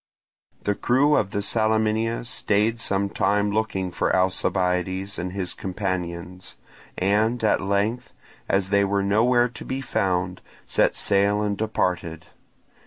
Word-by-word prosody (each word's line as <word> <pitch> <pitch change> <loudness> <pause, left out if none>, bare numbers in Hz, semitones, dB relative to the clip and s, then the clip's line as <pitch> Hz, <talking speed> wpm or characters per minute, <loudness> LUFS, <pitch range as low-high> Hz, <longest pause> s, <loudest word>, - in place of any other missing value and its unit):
The 105 - +1
crew 135 +8 +3
of 100 - +1
the 100 +1 -2
Salaminia 110 +2 0
stayed 115 -2 0
some 100 -1 0
time 100 +1 +1
looking 100 -4 -1
for - - 0
Alcibiades 95 +1 0
and 90 - -3
his 95 -1 -3
companions, 90 -2 -4 0.4
and 110 +5 +1
at 110 - +3
length, 105 +5 -1 0.4
as 95 0 +1
they 100 0 +4
were 100 0 +1
nowhere 120 +5 +3
to 120 - -9
be 130 - -3
found, 95 -7 -1 0.2
set - - +2
sail 100 +1 +2
and 105 -1 0
departed. 90 -6 -2
100 Hz, 130 wpm, -24 LUFS, 95-110 Hz, 0.4 s, they